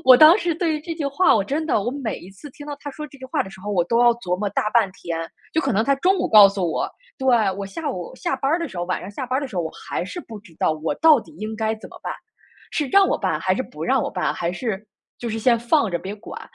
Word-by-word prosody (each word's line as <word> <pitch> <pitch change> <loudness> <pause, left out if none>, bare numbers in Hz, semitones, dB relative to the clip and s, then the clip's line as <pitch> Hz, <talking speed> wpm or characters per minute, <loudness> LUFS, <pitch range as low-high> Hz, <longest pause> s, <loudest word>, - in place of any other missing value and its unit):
我 255 -1 +9
当 315 +6 +9
时 340 -5 0
对 330 -1 0
于 300 - -3
这 330 +1 -5
句 320 -3 -4
话， 285 +7 +4
我 200 - +1
真 305 +8 -2
的 215 - +1
我 235 - -1
每 260 -5 -4
一 185 - -12
次 195 +10 -12
听 295 +2 -12
到 290 - -4
他 290 - -6
说 300 +2 -7
这 275 -1 -16
句 260 - -10
话 260 - 0
的 190 - -10
时 190 - -13
候， 205 - -5
我 180 -4 +2
都 230 +6 +2
要 240 -1 +6
琢 205 -7 -2
磨 205 +1 -1
大 210 - 0
半 225 -5 +3
天。 170 -3 -5 0.3
就 320 - +2
可 - - 0
能 220 - +2
他 275 - +3
中 370 +7 +3
午 - - +1
告 210 -2 +9
诉 195 -3 -2
我， - - -1 0.3
对， 265 - -3 0.3
我 195 +1 -5
下 290 +10 -4
午 180 -2 -6
下 - - -1
班 270 +1 -1
儿 325 - +2
的 335 - -2
时 190 - -8
候， 175 - -1
晚 185 - -2
上 195 - -7
下 255 +5 -5
班 255 +1 0
儿 - - 0
的 - - -2
时 235 - -12
候， 175 - +1
我 160 - -4
还 - - -4
是 275 - -7
不 225 -9 -10
知 190 -6 -18
道 - - +2
我 155 +1 -2
到 315 -5 +6
底 - - -16
应 215 +1 -5
该 220 0 -1
怎 220 - -11
么 - - -12
办， - - -3 0.6
是 295 - 0
让 390 +8 +5
我 - - +1
办 - - 0
还 - - +1
是 - - -1
不 - - -8
让 - - +2
我 - - -2
办， - - -1
还 170 - -2
是 210 +2 -4 0.3
就 240 - -4
是 225 0 -3
先 235 +1 +3
放 235 0 +2
着 170 - -1
别 195 +4 -6
管。 215 +1 -9
235 Hz, 335 characters per minute, -22 LUFS, 195-290 Hz, 0.6 s, 我